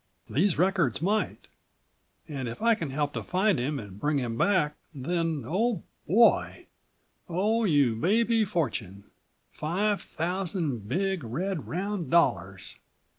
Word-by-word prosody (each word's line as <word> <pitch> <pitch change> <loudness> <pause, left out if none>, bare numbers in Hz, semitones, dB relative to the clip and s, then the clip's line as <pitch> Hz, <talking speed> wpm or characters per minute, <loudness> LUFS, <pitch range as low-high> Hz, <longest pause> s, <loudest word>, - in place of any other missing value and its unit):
These 175 +5 +1
records 180 - +2
might. 205 +6 -1 0.8
And 135 -5 -4
if 115 - -7
I 230 +1 +4
can 165 -9 -3
help 145 +1 -1
to - - -3
find 185 - +1
him 140 +4 -1
and 100 -4 -8
bring 150 +3 +1
him 120 -4 -2
back, 150 - +2 0.2
then, 165 +1 -1
oh, 210 - 0 0.2
boy! 230 +4 +4 0.6
Oh 215 +6 +1
you 145 - +3
baby 225 - +2
fortune! 150 - -2 0.5
Five 200 +6 0
thousand 165 - -3
big, 190 +4 0
red, 165 - -3
round 190 +1 -3
dollars!" 95 - +1
170 Hz, 125 wpm, -28 LUFS, 135-195 Hz, 0.8 s, I